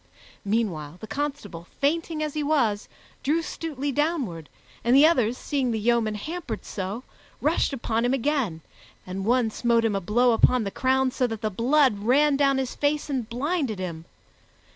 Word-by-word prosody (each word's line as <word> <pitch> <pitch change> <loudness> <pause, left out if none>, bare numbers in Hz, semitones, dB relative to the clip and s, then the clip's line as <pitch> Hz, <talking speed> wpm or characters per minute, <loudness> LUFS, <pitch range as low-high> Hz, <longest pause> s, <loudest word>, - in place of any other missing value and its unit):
Meanwhile, 185 -8 -2
the - - -7
constable, 220 - -5
fainting 315 +2 0
as 300 -2 -3
he 305 - -2
was, 265 -9 +1 0.3
drew 320 +4 +1
Stutely 290 -3 -4
downward, 270 - -1 0.3
and 240 +2 +4
the 280 +3 +8
others, 250 -7 +3
seeing 270 -4 -1
the 225 - 0
yeoman 225 -1 +1
hampered 290 - -5
so, 200 +5 -5 0.4
rushed 310 +1 +1
upon 230 -3 -1
him 245 - +2
again, 260 - -1 0.4
and 190 +1 -5
one 240 -1 +2
smote 235 0 +2
him 215 -3 +1
a 195 - -1
blow 240 +7 +3
upon 235 +1 +4
the 200 - -3
crown 260 +2 +1
so 255 -1 0
that 225 -2 -5
the 215 - -1
blood 250 +2 +3
ran 275 +7 +3
down 275 -1 +3
his 265 -2 -2
face 295 0 -1
and 250 -5 -2
blinded 270 - -1
him. 170 -3 -5
245 Hz, 170 wpm, -25 LUFS, 215-285 Hz, 0.4 s, the